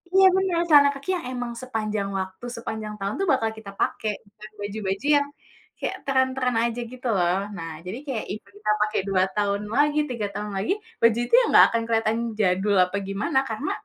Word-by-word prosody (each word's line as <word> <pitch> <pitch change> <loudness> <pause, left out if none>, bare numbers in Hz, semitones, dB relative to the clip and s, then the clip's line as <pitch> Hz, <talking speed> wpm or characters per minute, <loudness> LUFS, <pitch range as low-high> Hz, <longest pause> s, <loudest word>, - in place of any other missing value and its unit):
iya 385 0 +8
bener, 380 -3 +1
celana 285 -2 +8
kaki 280 +7 -9
yang 330 - -8
emang 245 -1 -3
sepanjang 215 -5 -2
waktu, 190 +5 -6
sepanjang 220 -2 -5
tahun 195 +1 -2
bakal 225 -5 +2
kita 200 -2 -9
pakai, 215 - 0
bukan 210 +1 -14
baju-baju 205 +3 -3
yang 285 0 0 0.5
kayak - - -3
tren-tren 260 -2 +1
aja 235 0 -1
gitu, 255 0 -6
loh. 180 -2 +2 0.2
Nah, 165 -1 -5
jadi 215 +8 -5
kayak, 245 -5 -2
ibarat 205 -1 -8
kita 210 0 +1
pakai 215 0 +1
2 185 -1 +3
tahun 205 0 0
lagi, 295 +1 +3
3 220 -4 -2
tahun 210 0 -4
lagi, 210 - +1 0.3
bajunya 240 - +5
nggak - - +9
akan 230 - +2
keliatan 225 -1 +1 0.2
jadul 195 +1 +2
apa 180 - -6
gimana, 210 +8 0
karena, 245 +7 -3
220 Hz, 180 wpm, -25 LUFS, 200-255 Hz, 0.5 s, nggak